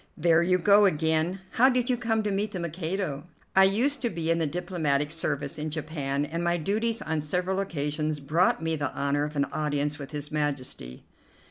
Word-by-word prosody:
"There 165 +1 +4
you 180 +1 +3
go 200 +3 +5
again. 160 +1 +1
How 255 +3 +5
did 250 -2 +1
you 255 - +2
come 225 -2 0
to 210 - -1
meet 205 +2 -1
the 185 - -3
Mikado?" 170 -2 -3 0.3
"I 190 0 +8
used 250 +9 +2
to 240 - 0
be 165 -4 -2
in 165 - +2
the 160 - +1
diplomatic 155 -4 -1
service 145 -3 -2
in 155 +1 -2
Japan, 145 -2 -2
and 165 +3 -4
my 175 0 +1
duties 220 +7 -1
on 160 -1 -1
several 180 +5 -1
occasions 150 -4 -2
brought 160 +4 +1
me 160 0 0
the 145 -2 -2
honor 140 +1 0
of 150 0 -7
an 140 -1 +2
audience 145 -1 -1
with 140 - -7
His 150 0 -6
Majesty." 140 - -3
160 Hz, 200 wpm, -27 LUFS, 150-190 Hz, 0.3 s, I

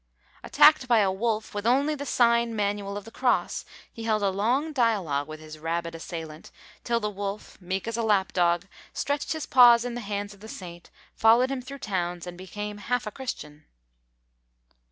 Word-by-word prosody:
Attacked 300 -4 +5
by 240 -2 +4
a 200 -3 +3
wolf, 215 +2 -2
with 205 +2 -2
only 280 +5 +3
the 285 -1 -6
sign 235 -1 +3
manual 200 -1 -2
of 205 - -8
the 225 - -11
cross, 250 +1 0 0.3
he 230 - -8
held 215 -2 +1
a 195 - +2
long 250 +11 0
dialogue 195 - +1
with 155 0 -8
his 155 0 -11
rabid 170 +1 -3
assailant, 160 -1 -8 0.3
till 235 -1 +1
the 210 - -2
wolf, 200 0 -6
meek 185 +3 -3
as 230 0 -2
a - - 0
lap 205 -4 +1
dog, 175 0 +2 0.3
stretched 285 +2 -1
his 315 -1 -4
paws 240 -2 +7
in 245 - -3
the 240 - -5
hands 205 -1 -4
of 200 - -18
the 215 - -11
saint, 175 -4 -9 0.2
followed 235 +4 +4
him 270 -2 -3
through 275 +2 -9
towns, 180 -7 -3
and 180 0 -7
became 205 +3 -6
half 245 +3 -1
a 210 - -4
Christian. 150 - -7
210 Hz, 190 wpm, -26 LUFS, 180-240 Hz, 0.3 s, paws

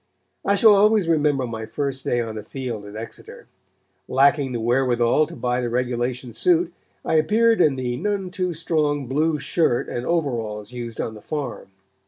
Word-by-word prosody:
I 200 - +2
shall 215 +1 +7
always 205 -2 +4
remember 150 -5 +2
my 110 -2 -6
first 140 -2 -3
day 120 - 0
on 115 -1 -4
the 110 - -5
field 115 -2 -6
at 100 +1 -10
Exeter. 115 +1 -9 0.6
Lacking 135 +1 +3
the 120 - -2
wherewithal 120 +3 +2
to 170 - -10
buy 125 -2 -1
the 120 - -2
regulation 125 0 -2
suit, 355 -1 +2 0.3
I 160 - +2
appeared 225 +7 +3
in 145 -5 +4
the 125 -2 -2
none 195 0 -2
too 180 -2 -2
strong 150 -3 0
blue 150 +5 +1
shirt 140 -2 0
and 120 - -3
overalls 115 -10 -2
used 120 -2 -7
on 110 - -2
the 105 - -11
farm. 145 -3 -5
135 Hz, 175 wpm, -23 LUFS, 120-165 Hz, 0.6 s, shall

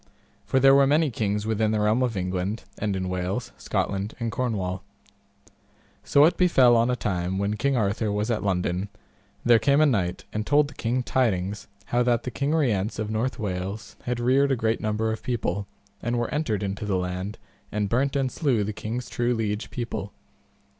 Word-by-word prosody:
For 130 - +3
there 135 +1 +7
were 140 0 +6
many 150 0 +3
kings 105 -2 -1
within 110 -1 +1
the 110 0 +1
realm 105 +4 +2
of 120 -5 0
England, 90 +3 -2 0.2
and 105 -2 -1
in 95 -1 -2
Wales, 90 +6 -3
Scotland, 100 +2 -2
and 115 -1 -2
Cornwall. 100 -8 -2 1.2
So 140 +1 +5
it 165 - +2
befell 130 -10 +5
on 115 +1 +3
a 125 - +2
time 95 -4 -2
when 100 +2 0
King 140 +3 +1
Arthur 105 0 0
was 105 +3 -1
at 110 - 0
London, 95 0 -1 0.6
there 120 -1 +6
came 140 +5 +3
a 155 - +6
knight 95 -11 0
and 110 - -1
told 145 +4 +3
the - - -12
king 125 +1 -1
tidings 105 -6 0 0.2
how 120 - +1
that 120 -1 +2
the 125 - -4
King 140 +5 0
Rience 110 -9 +1
of 110 -1 -3
North 115 +4 -1
Wales 100 0 -4
had 125 -1 -1
reared 135 +3 +3
a - - +3
great 115 -1 0
number 110 +1 0
of 110 - -4
people, 100 -5 -2 0.3
and 120 +1 -1
were 120 - -2
entered 120 -9 -1
into 100 +2 -3
the 100 -3 0
land, 90 +3 -3 0.3
and 105 -1 0
burnt 135 +6 +1
and 135 -2 +1
slew 130 -9 +1
the 105 +1 -3
king's 115 +4 -4
true 120 0 0
liege 105 -1 -2
people. 115 -5 -5
110 Hz, 195 wpm, -25 LUFS, 100-125 Hz, 1.2 s, there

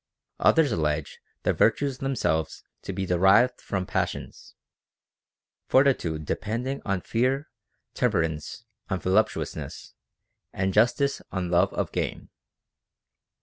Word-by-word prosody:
Others 160 -5 +4
allege 75 -5 -1 0.2
*he - - +3
virtues 135 +3 +1
themselves 80 - -1 0.2
to - - -5
be 95 - -3
derived 95 +8 +4
from 95 -2 -3
passions; - - -4 1.1
fortitude 90 - +2
depending 120 - -3
on 100 -3 -1
fear, 130 - 0 0.4
temperance 85 -2 -1 0.2
on 95 -2 -1
voluptuousness, 95 +5 -1 0.6
and 95 0 -1
justice 120 +6 +2
on 90 -2 -3
love 90 +2 +3
of - - -2
gain. - - -3
100 Hz, 105 wpm, -26 LUFS, 90-125 Hz, 1.1 s, Others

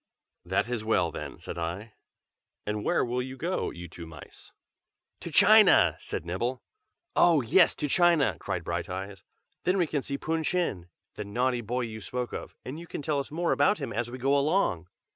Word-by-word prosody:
"That 95 +5 0
is 120 -3 -3
well 90 -6 +1
then," - - -7
said 85 - -7
I. 90 +7 -5 0.7
"And 105 0 -2
where - - +2
will 125 +1 -1
you 130 +1 -7
go, 175 +7 -2
you 85 0 -8
two 85 0 -10
mice?" 80 -1 -13 0.7
"To - - -7
China!" - - +6
said - - -5
Nibble. 120 +9 -3 0.5
"Oh! 165 -4 +5
yes, 165 +10 +4
to 150 - -2
China!" 170 -1 +3
cried - - -3
Brighteyes. 95 +1 -5 0.4
"Then 180 +2 +2
we 180 - +3
can 145 -2 -2
see 140 +1 -4
Pun 160 +2 -2
Chin, 150 - -1 0.2
the - - -5
naughty 125 +4 0
boy 120 +3 -2
you 110 -2 -5
spoke 125 +6 -4
of, - - -7
and 140 +5 -6
you 170 - -10
can 150 - -6
tell 145 -1 0
us 140 - -5
more 170 +3 -1
about 145 +8 +3
him 135 -6 -5
as 120 +2 -2
we 125 - -7
go 135 +3 +2
along!" 140 - +1
125 Hz, 190 wpm, -28 LUFS, 100-150 Hz, 0.7 s, China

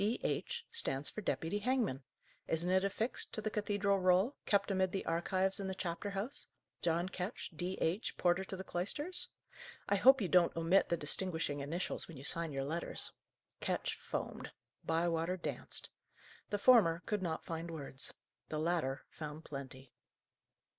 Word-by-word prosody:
D.H., 355 - -1
stands 140 - +2
for 215 - -5
Deputy 190 0 -1
Hangman. 230 - +1 0.5
Isn't 170 +3 0
it 190 0 +4
affixed 220 +5 +1
to - - +2
the 215 0 -2
cathedral 205 -1 +1
roll, 185 +8 +4
kept 200 0 +3
amid 190 -1 +2
the 195 - -2
archives 185 +4 +1
in 195 - -3
the 190 - -3
chapter 175 +2 -3
house" 200 +8 -3 0.3
John 170 +1 +1
Ketch, 190 +3 -5
D.H., 180 +3 -1
porter 175 +2 +3
to 190 - -4
the 190 - -6
cloisters! 290 - 0 0.6
"I 205 - +3
hope 265 +6 +7
you 200 - 0
don't 175 -1 +4
omit 165 +4 +4
the 170 - +2
distinguishing 160 -1 0
initials 160 +6 +1
when 165 - -10
you 130 - -9
sign 165 +2 0
your 135 -1 -2
letters?" 165 +4 -1 0.5
Ketch - - -1
foamed. - - -5 0.3
Bywater 165 +2 +1
danced. 170 - -2 0.6
The 205 - 0
former 195 -8 +6
could 210 -2 -1
not 165 -3 -2
find 165 +1 -4
words. 140 -4 -4 0.4
The 155 - -2
latter 155 -4 0
found 155 +1 -7
plenty. 135 -3 -8
180 Hz, 155 wpm, -35 LUFS, 165-200 Hz, 0.6 s, hope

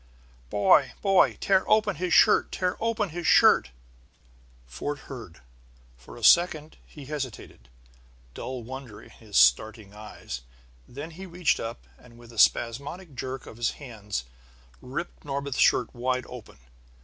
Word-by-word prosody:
"Boy! 100 +7 +3
Boy! 195 -2 +4
Tear 190 -1 +2
open 215 -7 +2
his 180 +1 -3
shirt! - - +5
Tear 180 0 -1
open 225 -3 -1
his 170 +1 -5
shirt!" - - +5 1.0
Fort 65 - -5
heard. 115 - -11 0.5
For 60 - -14
a 120 - -12
second 160 +1 +4
he 145 -3 -12
hesitated, 130 - -7 0.6
dull 130 -2 -6
wonder 125 -3 -9
in - - -16
his 105 -3 -5
starting 100 - +3
eyes; 105 -12 -8 0.5
then 145 +6 -8
he 190 +4 -10
reached 175 -2 0
up, 115 +1 -6
and 120 -1 -18
with 120 0 -15
a 115 - -6
spasmodic 140 - +1
jerk 130 +1 -6
of 110 - -12
his 120 0 -1
hands, 105 - -6 0.6
ripped 155 +7 -6
Norbith's 140 -1 -4
shirt 125 - +3
wide 125 0 -2
open. 125 -3 -11
130 Hz, 140 wpm, -26 LUFS, 110-160 Hz, 1.0 s, shirt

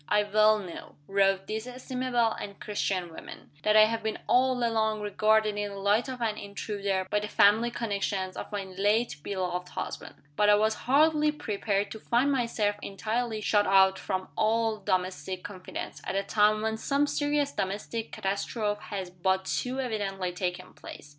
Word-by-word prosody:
"I 210 0 +4
well 215 +1 +4
know," 185 -5 -9
wrote 195 0 +2
this 220 +2 -4
estimable 250 -2 -1
and 200 -2 -7
Christian 185 -4 -2
woman, - - -11
"that 215 0 +2
I 215 - +9
have 225 +1 -2
been 220 0 -2
all 255 +1 +4
along 220 -1 0
regarded 215 +1 +2
in 205 0 -2
the 200 - -8
light 205 +6 +2
of 255 -2 -6
an 215 -2 -1
intruder 200 -1 -3
by 210 - +3
the 210 - -4
family 210 +4 +4
connections 200 -5 -2
of - - -7
my 205 -1 -2
late 200 +1 0
beloved 180 -1 -3
husband. - - -6 0.2
But 210 +4 +3
I 205 - +7
was 215 +1 +2 0.2
hardly 300 +2 +4
prepared 205 -7 -2
to 220 - -7
find 245 +6 +2
myself 230 -5 0
entirely 220 +2 -2
shut 205 -1 +2
out 190 0 +5
from 185 0 -3
all 225 0 +1
domestic 185 -1 -2
confidence, 185 -3 -7
at 185 - -3
a 195 - +1
time 215 +1 +3
when 220 0 -1
some 280 +5 +1
serious 290 0 0
domestic 205 +4 -3
catastrophe 205 +2 -2
has 190 -3 -5
but 190 +1 0
too 255 +6 -2
evidently 200 -7 -2
taken 180 0 -4
place. 145 - -11
210 Hz, 170 wpm, -28 LUFS, 195-225 Hz, 0.2 s, I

